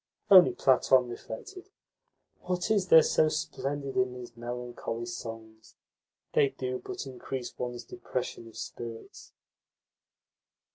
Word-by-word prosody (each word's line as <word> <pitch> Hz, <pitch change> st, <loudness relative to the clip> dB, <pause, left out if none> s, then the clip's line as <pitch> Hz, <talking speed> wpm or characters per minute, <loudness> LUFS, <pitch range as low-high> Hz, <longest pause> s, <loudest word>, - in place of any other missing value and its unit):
Only 180 Hz, -9 st, +9 dB
Platon 130 Hz, 0 st, +4 dB
reflected: 370 Hz, -, -8 dB, 0.7 s
"What 180 Hz, +3 st, -2 dB
is 200 Hz, -4 st, +2 dB
there 160 Hz, -2 st, +8 dB
so 155 Hz, -, +3 dB
splendid 140 Hz, -2 st, -3 dB
in 125 Hz, 0 st, +1 dB
these 120 Hz, -2 st, -9 dB
melancholy 120 Hz, -1 st, -5 dB
songs? 115 Hz, -1 st, -8 dB, 0.6 s
They 140 Hz, -, +4 dB
do 130 Hz, -2 st, -4 dB
but -, -, -5 dB
increase 130 Hz, -1 st, -6 dB
one's 120 Hz, -1 st, -4 dB
depression 130 Hz, -, -5 dB
of 115 Hz, -, -13 dB
spirits." 115 Hz, -1 st, -8 dB
125 Hz, 110 wpm, -29 LUFS, 120-145 Hz, 0.7 s, Only